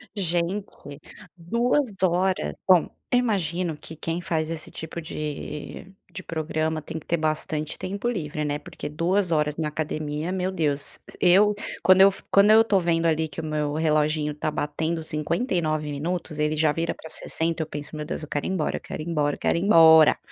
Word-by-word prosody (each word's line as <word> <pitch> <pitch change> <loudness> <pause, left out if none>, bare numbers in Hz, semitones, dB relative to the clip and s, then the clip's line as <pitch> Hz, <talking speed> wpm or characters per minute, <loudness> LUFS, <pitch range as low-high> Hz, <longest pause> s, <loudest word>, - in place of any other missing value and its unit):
Gente, 175 -4 -2 0.4
2 235 - 0
horas. 185 +1 +1
Bom, 180 -3 +5 0.2
eu 245 - +4
imagino 180 -7 -1
que 160 +2 -9
quem 165 +3 -3
faz 160 -2 -1
esse 160 -1 -6
tipo 160 +1 -6
de 150 +4 -6 0.2
de 185 - -7
programa, 160 -1 -2
tem 160 - -7
que 155 - -10
ter 170 - 0
bastante 155 -1 -2
tempo 200 +5 -4
livre, 155 -7 -3
né, 145 0 -1
porque 150 - -8
2 175 +4 0
horas 150 -1 +1
na 160 -2 -2
academia, 155 +1 -3
meu 185 0 -1
Deus 150 -5 -1 0.2
eu, 200 +4 +5 0.3
quando 185 +2 +6
eu 195 - +9
f 195 - -9
quando 200 +1 +6
eu 220 +1 +8
estou 205 -4 +2
vendo 170 -1 0
ali 160 -1 +1
que 155 - -9
o - - -4
meu 150 -1 -2
reloginho 155 -1 +1
está 150 +1 -3
batendo 160 +3 -2
59 155 - -1
minutos, 160 +1 -4
ele 150 +1 +1
já 155 -1 +3
vira 165 +2 -2
para 160 - -11
60, 165 0 +1
eu 155 - -3
penso: 150 0 -7
"Meu 150 - -4
Deus, 155 - -5
eu - - -7
quero 145 - -2
ir - - -2
embora, 175 -6 -1
eu - - -10
quero - - -7
ir 165 - -9
embora, 150 -3 0
quero - - +1
ir - - -3
embora!". 160 -5 +7
160 Hz, 190 wpm, -25 LUFS, 150-180 Hz, 0.4 s, eu